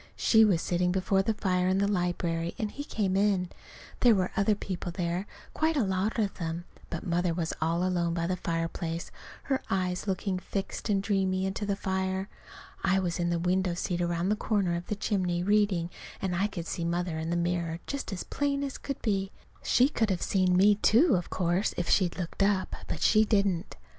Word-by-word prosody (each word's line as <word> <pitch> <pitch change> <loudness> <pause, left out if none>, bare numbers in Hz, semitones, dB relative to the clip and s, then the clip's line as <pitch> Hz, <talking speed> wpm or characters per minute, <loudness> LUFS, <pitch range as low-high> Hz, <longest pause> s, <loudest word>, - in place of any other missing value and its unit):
She 220 -1 +5
was 190 -6 +3
sitting 180 0 +1
before 190 +1 +2
the 215 +3 0
fire 180 -3 +1
in 185 +1 +2
the 200 +1 +2
library, 175 -3 -1
and 215 -2 -2
he 285 - -6
came 200 -9 -1
in. 195 -3 +2 0.5
There 240 -3 +6
were 185 -1 0
other 200 +2 +3
people 185 -3 -5
there, 175 +2 -2 0.3
quite 315 0 +1
a 265 - +3
lot 190 +3 0
of 210 -3 0
them; 165 0 -3 0.2
but 170 - -5
Mother 175 -1 0
was 165 -2 -2
all 165 +2 +1
alone 170 -2 0
by 170 -1 -1
the 185 +2 0
fireplace, 165 -1 -3 0.3
her 270 -1 0
eyes 185 0 -1
looking 190 0 -1
fixed 195 +4 -4
and 195 -2 +2
dreamy 190 -2 +1
into 195 +2 -3
the 200 - +1
fire. 190 0 -2 0.5
I 195 0 +3
was 180 -2 -1
in 175 0 +1
the 170 - +1
window 180 +1 +1
seat 175 0 -2
around 175 +1 0
the 210 - +3
corner 200 -5 0
of 170 +1 -5
the 210 - -1
chimney 180 -4 0
reading; 200 -4 +2 0.3
and 185 -2 -1
I 195 +4 +2
could 180 -5 -6
see 170 - -3
Mother 170 -1 -1
in 160 +1 -3
the 170 - 0
mirror 170 -1 -1
just 280 -5 -4
as 190 - -4
plain 280 -1 -1
as 275 -2 -4
could 275 - -5
be. 195 -3 0 0.3
She 250 +2 +4
could 225 -7 0
have 185 -3 -1
seen 185 -2 +2
me, 200 +2 +5
too, 270 +11 +5
of 175 -1 -2
course, 180 +2 0
if 175 - -1
she'd 180 -3 +2
looked 180 +1 -4
up. 195 -1 +1
But 155 - -4
she 215 0 +5
didn't. 200 -4 0
185 Hz, 205 wpm, -29 LUFS, 175-205 Hz, 0.5 s, There